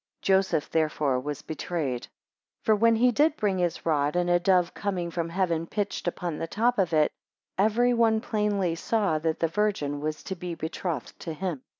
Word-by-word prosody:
4 195 Hz, -, +3 dB
Joseph 190 Hz, -5 st, +1 dB
therefore 150 Hz, -4 st, +1 dB
was 145 Hz, +1 st, -5 dB
betrayed. 155 Hz, -6 st, -3 dB
5 -, -, -26 dB, 0.5 s
For, 215 Hz, -, +4 dB
when 230 Hz, +2 st, +4 dB
he 245 Hz, +2 st, +4 dB
did 300 Hz, +5 st, +2 dB
bring 195 Hz, -3 st, 0 dB
his 175 Hz, -2 st, -1 dB
rod, 150 Hz, -2 st, +1 dB
and 175 Hz, 0 st, +1 dB
a 175 Hz, -, +4 dB
dove 180 Hz, -1 st, +2 dB
coming 180 Hz, -4 st, -2 dB
from 170 Hz, -1 st, -2 dB
Heaven 170 Hz, -2 st, 0 dB
pitched 205 Hz, -2 st, -3 dB
upon 175 Hz, -2 st, -3 dB
the 165 Hz, -, -3 dB
top 235 Hz, +5 st, +1 dB
of 180 Hz, -3 st, +2 dB
it, 155 Hz, -2 st, +3 dB, 0.4 s
every 225 Hz, +5 st, +3 dB
one 225 Hz, -2 st, +3 dB
plainly 210 Hz, -5 st, 0 dB
saw, 180 Hz, -1 st, 0 dB
that 160 Hz, 0 st, -1 dB
the 165 Hz, -, +2 dB
Virgin 160 Hz, -6 st, -1 dB
was 155 Hz, +1 st, -4 dB
to 190 Hz, -, -4 dB
be 175 Hz, -1 st, -5 dB
betrothed 165 Hz, +1 st, -4 dB
to 165 Hz, -, -5 dB
him. 165 Hz, -4 st, -3 dB
175 Hz, 195 wpm, -27 LUFS, 160-205 Hz, 0.5 s, For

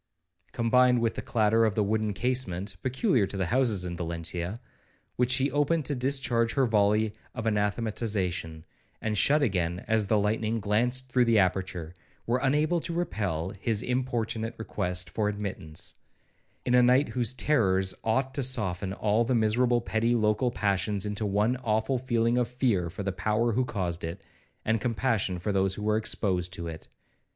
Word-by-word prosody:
'—combined 125 Hz, +1 st, +3 dB
with 115 Hz, -1 st, 0 dB
the -, -, -5 dB
clatter 110 Hz, 0 st, +2 dB
of 110 Hz, -3 st, +1 dB
the 105 Hz, -, +2 dB
wooden 110 Hz, +1 st, 0 dB
casement 100 Hz, -4 st, -2 dB
(peculiar 130 Hz, -, +1 dB
to 100 Hz, -, -6 dB
the 95 Hz, -, 0 dB
houses 115 Hz, -4 st, +1 dB
in 90 Hz, -1 st, -4 dB
Valentia) 85 Hz, +3 st, -4 dB, 0.6 s
which 125 Hz, 0 st, +1 dB
she 130 Hz, +2 st, +2 dB
opened 145 Hz, +2 st, +1 dB
to 145 Hz, -, -1 dB
discharge 125 Hz, -3 st, 0 dB
her 135 Hz, -2 st, +3 dB
volley 105 Hz, -1 st, +2 dB, 0.2 s
of 115 Hz, -2 st, -4 dB
anathematization, 105 Hz, -6 st, -1 dB, 0.4 s
and 110 Hz, -1 st, -2 dB
shut 145 Hz, +8 st, +4 dB
again 90 Hz, -6 st, -1 dB
as 110 Hz, -2 st, +2 dB
the 110 Hz, -, +3 dB
lightning 110 Hz, +2 st, 0 dB
glanced 120 Hz, +5 st, +1 dB
through 125 Hz, -1 st, +2 dB
the 115 Hz, -1 st, +3 dB
aperture, 90 Hz, -3 st, 0 dB, 0.3 s
were 120 Hz, +2 st, +1 dB
unable 150 Hz, +5 st, +2 dB
to 165 Hz, -, -4 dB
repel 95 Hz, -, -2 dB
his 110 Hz, -3 st, 0 dB
importunate 120 Hz, -3 st, -2 dB
request 90 Hz, -5 st, -2 dB
for 105 Hz, +5 st, -1 dB
admittance, 100 Hz, -7 st, -5 dB, 0.7 s
in 125 Hz, -, +1 dB
a 125 Hz, -, +6 dB
night 125 Hz, +3 st, +4 dB
whose 125 Hz, -1 st, 0 dB
terrors 95 Hz, -10 st, +2 dB
ought 130 Hz, +4 st, 0 dB
to 140 Hz, -, -1 dB
soften 100 Hz, -7 st, 0 dB
all 105 Hz, +3 st, +1 dB
the 125 Hz, +2 st, 0 dB
miserable 120 Hz, +2 st, +2 dB
petty 115 Hz, +1 st, 0 dB
local 110 Hz, +2 st, +2 dB
passions 100 Hz, -2 st, -1 dB
into 105 Hz, +1 st, -2 dB
one 105 Hz, +5 st, +1 dB
awful 115 Hz, +1 st, 0 dB
feeling 120 Hz, -1 st, +1 dB
of 120 Hz, -, +1 dB
fear 115 Hz, -8 st, 0 dB
for 90 Hz, +4 st, -6 dB
the 95 Hz, -, -1 dB
Power 110 Hz, +5 st, 0 dB
who 130 Hz, +4 st, +2 dB
caused 90 Hz, -7 st, -3 dB
it, 85 Hz, +4 st, -5 dB, 0.4 s
and 110 Hz, 0 st, +1 dB
compassion 115 Hz, -6 st, 0 dB
for 95 Hz, +4 st, -2 dB
those 95 Hz, -1 st, +1 dB
who 105 Hz, -, -6 dB
were 105 Hz, 0 st, +2 dB
exposed 90 Hz, -5 st, 0 dB
to 85 Hz, -, -5 dB
it. 80 Hz, -1 st, -8 dB
110 Hz, 170 wpm, -28 LUFS, 95-125 Hz, 0.7 s, a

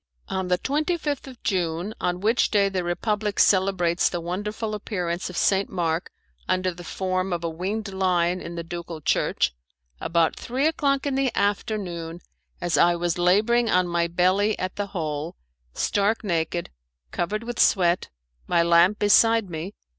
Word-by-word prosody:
On 190 Hz, -1 st, -2 dB
the 180 Hz, 0 st, +2 dB
25th 295 Hz, -, -1 dB
of 255 Hz, -3 st, -12 dB
June, 175 Hz, +1 st, -1 dB
on 180 Hz, 0 st, -1 dB
which 225 Hz, +4 st, +2 dB
day 200 Hz, -2 st, +3 dB
the 185 Hz, -2 st, -2 dB
Republic 210 Hz, +4 st, -1 dB
celebrates 185 Hz, -3 st, +3 dB
the 175 Hz, -, -3 dB
wonderful 210 Hz, +5 st, -4 dB
appearance 180 Hz, -5 st, -3 dB
of 180 Hz, -, -7 dB
St. 195 Hz, 0 st, +2 dB
Mark 170 Hz, -2 st, -1 dB, 0.4 s
under 185 Hz, 0 st, +1 dB
the 175 Hz, +1 st, -11 dB
form 185 Hz, +1 st, -2 dB
of 170 Hz, -1 st, -2 dB
a 170 Hz, -, -1 dB
winged 195 Hz, +5 st, -4 dB
lion 180 Hz, -1 st, +1 dB
in 170 Hz, -, -7 dB
the 170 Hz, -, -4 dB
ducal 170 Hz, -1 st, -6 dB
church, 140 Hz, -, +1 dB, 0.5 s
about 165 Hz, -1 st, +1 dB
three 260 Hz, +4 st, -2 dB
o'clock 280 Hz, -3 st, +1 dB
in 285 Hz, -, 0 dB
the 265 Hz, -1 st, +1 dB
afternoon, 180 Hz, -5 st, -2 dB, 0.4 s
as 170 Hz, -4 st, 0 dB
I 175 Hz, 0 st, +5 dB
was 175 Hz, +1 st, -1 dB
labouring 215 Hz, +7 st, +3 dB
on 180 Hz, 0 st, +3 dB
my 170 Hz, 0 st, +1 dB
belly 185 Hz, +5 st, +2 dB
at 185 Hz, 0 st, -4 dB
the 205 Hz, -1 st, -3 dB
hole, 160 Hz, -4 st, -4 dB, 0.4 s
stark 205 Hz, +3 st, +1 dB
naked, 170 Hz, -2 st, -2 dB, 0.4 s
covered 210 Hz, +6 st, -2 dB
with 240 Hz, 0 st, -5 dB
sweat, 175 Hz, -3 st, +3 dB, 0.4 s
my 170 Hz, -, +3 dB
lamp 170 Hz, +4 st, +4 dB
beside 220 Hz, 0 st, +4 dB
me. 165 Hz, +5 st, -5 dB
185 Hz, 160 wpm, -24 LUFS, 170-210 Hz, 0.5 s, I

